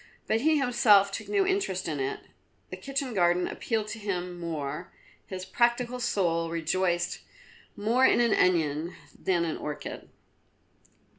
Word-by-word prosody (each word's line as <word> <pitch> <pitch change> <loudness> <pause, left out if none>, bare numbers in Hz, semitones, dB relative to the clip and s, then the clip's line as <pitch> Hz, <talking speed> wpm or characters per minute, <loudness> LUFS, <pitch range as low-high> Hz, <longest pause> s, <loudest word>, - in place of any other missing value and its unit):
But 220 +1 +1
he 310 +2 +3
himself 230 -7 +4
took - - -6
no 400 -2 +2
interest 375 - -1
in 150 -3 -3
it. 135 0 -2 0.5
The - - -4
kitchen 275 -2 -3
garden 175 -2 +2
appealed 220 -2 -2
to 225 +1 -6
him 180 -4 -4
more; 155 -1 -4 0.4
his 185 -1 -6
practical 240 +4 +1
soul 170 -8 0
rejoiced 175 +2 0 0.6
more 230 +5 +1
in - - +3
an 235 -2 +3
onion 165 -2 +1 0.2
than 175 -3 0
an 160 - -2
orchid. 150 -1 -6
190 Hz, 140 wpm, -28 LUFS, 170-240 Hz, 0.6 s, himself